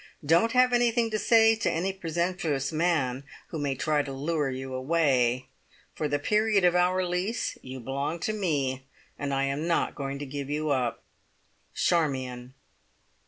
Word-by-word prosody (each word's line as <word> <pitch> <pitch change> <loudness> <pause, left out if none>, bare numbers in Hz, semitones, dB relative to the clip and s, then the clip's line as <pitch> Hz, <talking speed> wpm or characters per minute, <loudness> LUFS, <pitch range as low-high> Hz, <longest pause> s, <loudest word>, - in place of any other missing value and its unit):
Don't 170 +9 +3
have 250 0 +4
anything 240 -1 +2
to 215 - 0
say 225 0 +5
to 225 - 0
any 185 +4 -1
presumptuous 170 -5 -2
man 155 -6 0 0.3
who 160 - -5
may 140 -2 -1
try 150 +2 +1
to 140 -1 -6
lure 145 +1 -1
you 130 0 -5
away. 130 -3 +1 0.5
For 155 - -2
the 145 0 0
period 210 +4 +2
of 175 0 +4
our 180 +1 +2
lease 180 +6 -2
you 130 0 -8
belong 140 +6 -3
to 215 - -1
me, 140 -10 -1 0.3
and 145 -1 -2
I 135 0 +1
am 140 +4 -1
not 170 - +1
going 140 -1 -4
to 145 - -5
give 140 0 -6
you 150 +1 -1
up. 125 -4 -1 0.7
"Charmion." 130 -6 -1
150 Hz, 165 wpm, -27 LUFS, 135-180 Hz, 0.7 s, say